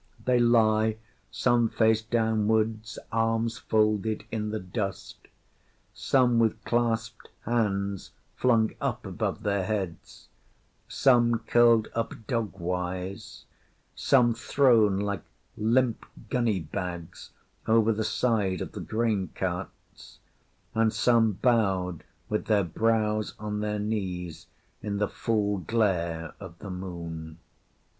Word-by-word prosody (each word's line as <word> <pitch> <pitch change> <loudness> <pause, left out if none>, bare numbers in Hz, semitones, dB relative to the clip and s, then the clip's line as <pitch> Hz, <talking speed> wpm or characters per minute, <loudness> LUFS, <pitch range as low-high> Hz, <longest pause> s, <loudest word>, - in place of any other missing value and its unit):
They 125 -1 +3
lie 110 -2 +3 0.3
some 120 -2 +2
face 110 -1 +3
downwards, 110 -1 0
arms 115 0 0
folded, 110 0 +1
in 105 -1 -2
the 110 0 -3
dust; 95 +1 -5 0.7
some 125 -3 +2
with 115 -1 +1
clasped 115 -2 -1
hands 100 -4 -1 0.3
flung 115 -3 +2
up - - -2
above - - -3
their 100 -2 0
heads; 95 -4 -5 0.6
some 120 -3 +3
curled 115 -2 +5
up 115 0 -2
dog 110 -7 -2
wise; 90 +2 -4 0.5
some 120 -3 +3
thrown 115 -4 +3
like 100 -3 -2 0.3
limp 115 +2 +1 0.3
gunny 115 -7 +1
bags 85 +2 -6 0.4
over 115 0 +4
the 110 +1 -2
side 110 -4 0
of - - -5
the - - -7
grain 110 -5 -1
carts; - - -6 0.6
and 110 0 +2
some 115 0 +3
bowed 95 -6 +1 0.2
with 105 -1 -2
their 105 -2 +3
brows 110 +3 0
on 105 0 -4
their 105 0 -1
knees 95 -6 -4 0.3
in 100 -1 -3
the 105 0 +1
full 105 -3 -1
glare 85 -4 -1
of 95 -4 -10
the 100 0 -8
Moon. 85 -3 -7
110 Hz, 115 wpm, -27 LUFS, 95-115 Hz, 0.7 s, curled